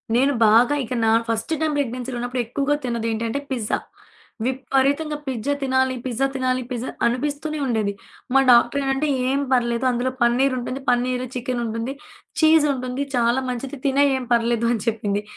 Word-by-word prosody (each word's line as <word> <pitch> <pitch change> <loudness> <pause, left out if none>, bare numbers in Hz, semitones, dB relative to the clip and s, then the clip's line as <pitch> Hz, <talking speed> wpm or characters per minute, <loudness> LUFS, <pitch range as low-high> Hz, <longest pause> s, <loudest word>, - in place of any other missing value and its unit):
నేను 270 +4 +3
బాగా 240 +6 +5
ఇక 250 - -5
నా - - +3 0.2
ఫస్ట్ 230 +4 -2
టైమ్ 310 -1 +1
ప్రెగ్నెన్సీలో 255 -2 -3
ఉన్నప్పుడు 245 +1 -2
ఎక్కువగా 280 +5 0
తిన్నదేంటంటే 230 0 -2
పిజ్జా. 235 -5 -1 0.7
విపరీతంగా 275 +4 0
పిజ్జా 260 +2 -1
తినాలి, 260 -1 +1
పిజ్జా 260 +2 0
తినాలి 255 -1 0
పిజ్జా 245 0 -3 0.2
అనిపిస్తూనే 290 +5 -1
ఉండేది. 220 -5 0 0.4
మా 270 - +6
డాక్టరేంటంటే 270 +4 +3 0.2
"ఏం 275 +1 +1
పర్లేదు. 240 0 +1
అందులో 250 +1 -1
పన్నీరుంటుంది 255 +2 +1
పన్నీరు, 250 +1 +1
చికెనుంటుంది. 240 0 -3 0.5
చీజుంటుంది. 280 -5 +3
చాలా 240 +1 +2
మంచిది 255 +3 -5
తినెయి 280 +1 +3
ఏం 255 - -5
పర్లేదు" 235 0 +1
అని 225 - -2
చెప్పింది. 210 -2 -1
255 Hz, 135 wpm, -22 LUFS, 235-270 Hz, 0.7 s, మా